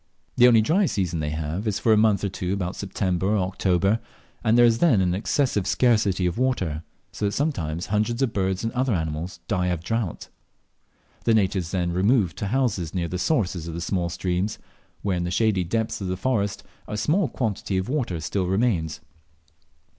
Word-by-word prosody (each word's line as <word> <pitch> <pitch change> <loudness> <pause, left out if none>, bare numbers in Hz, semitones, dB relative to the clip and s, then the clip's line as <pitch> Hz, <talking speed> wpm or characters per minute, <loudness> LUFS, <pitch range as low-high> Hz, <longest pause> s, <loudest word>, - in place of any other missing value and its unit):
The 125 - +7
only 115 -3 +6
dry 180 - +3
season 90 - -1
they 75 -1 -2
have 80 +7 -3
is 105 - 0
for 110 - +3
a - - +6
month 105 -2 +3
or 100 - 0
two 90 0 -3
about 95 -2 -2
September 95 -2 -1
or 105 +1 +2
October, 95 +2 +1 0.4
and 110 +2 +3
there 120 - +7
is 115 -1 +3
then 140 - +4
an 90 -2 +2
excessive 105 +1 0
scarcity 105 -7 +2
of 90 +5 -1
water, 95 -13 0 0.3
so 105 - -3
that 100 - 0
sometimes 85 - -1
hundreds 110 +5 0
of 125 - 0
birds 95 0 -1
and 115 - -2
other 130 -3 +1
animals 80 +2 -4
die 90 -4 0
of 90 -2 -2
drought. 115 -3 -3 1.0
The 115 - +4
natives 95 -4 +1
then 90 -2 -1
remove 95 0 +2
to 100 - -3
houses 100 - -1
near 85 -2 0
the 90 +2 -4
sources 95 - 0
of 85 - -5
the - - -4
small 90 -1 -1
streams, 90 +3 -2 0.5
where, 95 -3 0
in 85 - -1
the 85 - -2
shady 100 0 +2
depths 110 +5 -2
of 95 - -3
the 90 0 -2
forest, 100 -3 -1 0.2
a 105 - -4
small 165 - +2
quantity 105 -6 -2
of 95 - -1
water 125 - -1
still 90 +4 -1
remains. 90 - 0
100 Hz, 195 wpm, -24 LUFS, 90-115 Hz, 1.0 s, The